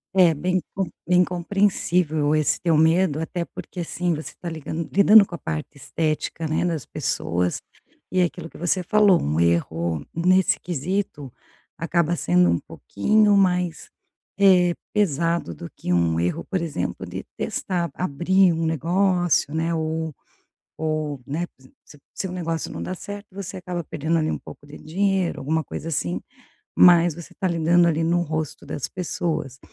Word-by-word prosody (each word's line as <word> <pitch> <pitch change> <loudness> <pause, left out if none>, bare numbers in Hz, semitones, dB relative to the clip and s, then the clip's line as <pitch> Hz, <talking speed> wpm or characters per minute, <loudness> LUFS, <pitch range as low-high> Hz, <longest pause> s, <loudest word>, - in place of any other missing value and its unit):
É, 175 -3 +6
bem 180 +5 0
com 195 -3 -2 0.2
bem 180 0 +5
compreensível 175 -4 +1
esse 155 -1 +1
teu 170 -3 +2
medo. 160 0 +3
Até 170 +2 -3
porque, 180 - -8
assim, 175 +1 -1
você 155 - -6
está 175 - -7
ligan 160 0 -5
lidando 205 +2 +8
com 175 - -8
a - - -6
parte 80 - -4
estética, 155 +3 -2
né, 155 +3 0
das 160 -7 -2
pessoas 90 +1 -2 0.5
e 185 - +1
é - - +5
aquilo 170 -1 -6
que - - -14
você 175 +2 0
falou, 205 0 +4
um 75 +3 -1
erro 85 -2 0
nesse 185 +2 +3
quesito, 170 - -3 0.5
acaba 170 0 +1
sendo 90 - +3
um 85 - +2
pouquinho 205 - +2
mais, 180 -3 +1 0.5
eh, 180 -3 +5 0.2
pesado 170 - 0
do 85 +2 -9
que 90 - -2
um 85 -2 +2
erro, 90 - -1
por 190 - 0
exemplo, 165 -2 -3
de - - -6
testar, 175 -3 -2
abrir 185 +3 +2
um 165 0 -1
negócio, 175 0 +1
né, 165 +1 0
ou 160 0 -2 0.7
ou, 155 -3 -2
né, 160 +6 -3
se 130 0 -20 0.2
se 150 - -15
o - - -23
seu 190 -2 -4
negócio 165 -3 -3
não - - -5
dá 185 - -4
certo, 205 +2 -8
você 190 -1 -7
acaba 175 -2 -5
perdendo 160 +2 -1
ali 155 - 0
um - - -2
pouco 145 - -13
de 145 +1 -11
dinheiro, 190 +2 0
alguma 155 +4 0
coisa, 160 - -7
assim, 90 - -2 0.6
mas 175 -2 +7
você 170 - -11
tá 190 - -1
lidando 170 +1 +3
ali 165 0 +1
no 170 +1 +2
rosto 155 -2 -4
das 140 - -4
pessoas. 155 -6 -3
165 Hz, 165 wpm, -23 LUFS, 150-180 Hz, 0.7 s, lidando